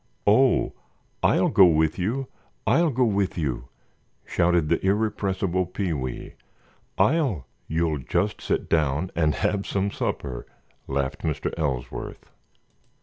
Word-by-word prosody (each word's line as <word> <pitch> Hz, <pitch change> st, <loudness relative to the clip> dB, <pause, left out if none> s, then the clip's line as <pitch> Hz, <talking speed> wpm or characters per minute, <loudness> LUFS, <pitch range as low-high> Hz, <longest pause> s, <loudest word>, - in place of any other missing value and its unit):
"Oh, 120 Hz, +5 st, +4 dB, 0.5 s
I'll -, -, +3 dB
go 95 Hz, -, +7 dB
with 80 Hz, +1 st, +2 dB
you! 120 Hz, +9 st, -1 dB, 0.4 s
I'll 170 Hz, -1 st, +4 dB
go 130 Hz, -2 st, +1 dB
with 100 Hz, -5 st, 0 dB
you!" 65 Hz, -6 st, -2 dB, 0.6 s
shouted 85 Hz, -2 st, +2 dB
the -, -, +1 dB
irrepressible 95 Hz, -3 st, 0 dB
Pee 90 Hz, -1 st, -2 dB
wee. 65 Hz, -4 st, -5 dB, 0.6 s
"I'll——" 135 Hz, -, +2 dB, 0.2 s
"You'll 80 Hz, -2 st, 0 dB
just 90 Hz, +9 st, -1 dB
sit -, -, -1 dB
down 80 Hz, +2 st, +1 dB
and 80 Hz, -4 st, +2 dB
have 100 Hz, +8 st, -1 dB
some 100 Hz, 0 st, 0 dB
supper," 65 Hz, -9 st, -4 dB, 0.4 s
laughed 70 Hz, 0 st, -2 dB
Mr. 75 Hz, -3 st, -2 dB
Ellsworth. 70 Hz, -7 st, -4 dB
90 Hz, 120 wpm, -25 LUFS, 75-100 Hz, 0.6 s, go